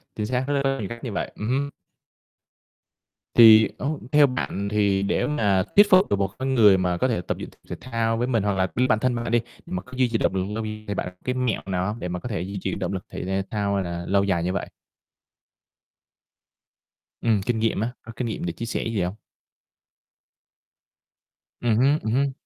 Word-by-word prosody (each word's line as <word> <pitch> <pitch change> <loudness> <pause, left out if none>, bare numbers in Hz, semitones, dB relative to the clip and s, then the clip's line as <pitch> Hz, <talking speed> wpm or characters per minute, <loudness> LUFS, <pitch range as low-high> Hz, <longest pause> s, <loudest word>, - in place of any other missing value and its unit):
chính 105 - -2
xác 125 +3 -1
rất 145 -1 +1
rất 135 0 0
nhiều 100 - -4
cách 115 +1 -8
như 120 - -4
vậy. 100 - -3
Ừm 105 +2 -4
hứm. 140 +2 0 1.7
Thì 110 -1 +8
ô, 145 +3 -2
theo 150 -1 +7
bạn 100 -6 -3
thì 100 -2 +1
để 100 - 0
mà 105 -11 +2
thuyết 205 0 +7
phục 185 0 +5
được - - +3
một 100 -1 +1
cái 130 - -2
người 105 -7 +5
mà 90 -1 0
có 130 - +1
thể 115 -8 0
tập - - -3
dựng - - -7
thể - - -24
dục - - -8
thao 115 -2 -1
với 120 +2 0
mình, 115 -5 +1
hoặc 100 0 +1
là 95 - +2
chính 125 +2 +2
bản 110 - +3
thân 130 +2 +1
bạn 120 -1 -3
đi, 120 0 +3 0.3
mà 90 0 -4
có 125 - -19
duy 130 -1 +3
trì 115 -1 0
động 95 - +1
lực 95 - 0
lâu 110 0 -3
dài, 110 0 -6
thì 100 - -1
bạn 90 -1 -4
cái 125 - -1
mẹo 125 -4 0
nào 95 +3 -1
để 90 - -4
mà 90 0 -3
có - - -6
thể 105 -7 -3
duy 95 +3 -5
trì - - -2
động - - -3
lực - - -4
thể 95 +2 -2
thao 100 -2 -1
hay 95 -2 0
là 85 0 -5
lâu 100 0 +2
dài 85 -4 0
như 90 - 0
vậy? - - -2 2.5
Ừm, 110 -3 +2
kinh 115 +3 -1
nghiệm 110 -2 0
á, 115 +3 -1
có 115 - -10
kinh 125 - -2
nghiệm 110 - -4
để 85 - -2
chia 115 +8 -6
sẻ 115 - -2
gì 115 -3 -1
hông? 90 +3 -3 2.4
Ừm 115 -3 +2
hứm, 140 +6 +4
ừm 110 - -2
hứm. 135 +2 +1
110 Hz, 225 wpm, -24 LUFS, 100-125 Hz, 2.5 s, Thì